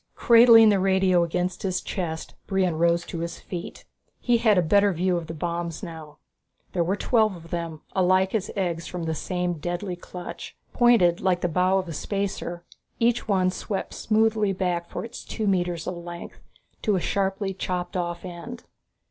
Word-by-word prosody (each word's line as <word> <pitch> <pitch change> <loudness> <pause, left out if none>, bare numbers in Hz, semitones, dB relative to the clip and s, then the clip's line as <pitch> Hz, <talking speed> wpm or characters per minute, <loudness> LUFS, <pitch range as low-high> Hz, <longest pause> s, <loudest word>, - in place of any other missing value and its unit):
Cradling 230 -1 +7
the 200 -2 +3
radio 190 -2 +3
against 180 +2 -2
his 185 -2 -1
chest, 165 -4 -4
Brion 190 -4 +1
rose 170 0 +2
to 170 - -6
his 170 0 -5
feet. 175 -2 -7 0.3
He 245 -1 +2
had 220 -4 +4
a 180 - +4
better 200 +4 +4
view 180 +2 +1
of 170 -2 -3
the 165 - -6
bombs 170 0 -3
now. 155 -3 -9 0.6
There 175 - +2
were 185 +4 0
twelve 215 -2 +2
of 165 -1 -13
them, 165 -2 -4
alike 185 0 +3
as 210 -3 -1
eggs 175 -4 -2
from 180 -2 -5
the 160 0 -1
same 180 +1 -2
deadly 175 +3 -3
clutch. 180 0 -9 0.2
Pointed 225 -8 +4
like 185 -2 +1
the - - +1
bow 180 +3 +2
of 185 -1 -2
a 165 - -5
spacer, 185 -1 -3 0.3
each 235 0 +1
one 185 -3 +2
swept 195 +1 -4
smoothly 220 -2 +1
back 180 -2 -2
for - - -5
its 235 +1 -9
two 220 - -4
metres 175 -4 0
of 180 - -4
length, 170 0 -9 0.4
to 210 -3 +1
a - - +1
sharply 195 +1 -1
chopped 180 -1 -3
off 175 0 -3
end. 185 +8 -8
180 Hz, 180 wpm, -25 LUFS, 170-200 Hz, 0.6 s, Cradling